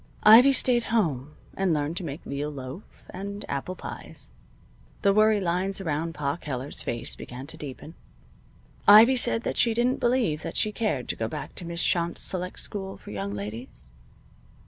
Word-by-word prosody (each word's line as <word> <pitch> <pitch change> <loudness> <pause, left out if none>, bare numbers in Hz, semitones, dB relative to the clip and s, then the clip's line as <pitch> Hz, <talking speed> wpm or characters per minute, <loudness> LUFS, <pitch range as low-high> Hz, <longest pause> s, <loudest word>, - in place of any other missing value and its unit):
Ivy 235 +6 +9
stayed 245 -2 +2
home 155 - -1 0.2
and 190 -4 +1
learned 150 +2 -2
to 185 - -3
make 150 -1 -6
veal 145 +2 -3
loaf 135 +4 -7 0.3
and 200 +2 -6
apple 140 +7 -4
pies. - - -9 0.7
The 200 -1 +5
worry 215 0 +4
lines 185 +2 -1
around 165 -2 -2
Pa 145 +1 -2
Keller's 140 -3 -5
face 115 - -3
began 125 +2 -8
to 160 - -7
deepen. 150 +1 -8 0.9
Ivy 220 +5 +9
said 240 -2 +2
that - - -3
she 230 -2 +3
didn't 245 +2 +1
believe 240 -11 +1
that - - -5
she 215 - +1
cared 210 - -2
to - - -1
go 110 - -2
back - - -6
to 175 - -7
Miss 170 0 -2
Shont's 170 -1 0
select 180 -1 -3
school 195 -2 -3
for - - -11
young 100 0 -4
ladies. 105 - -8
170 Hz, 170 wpm, -26 LUFS, 140-210 Hz, 0.9 s, Ivy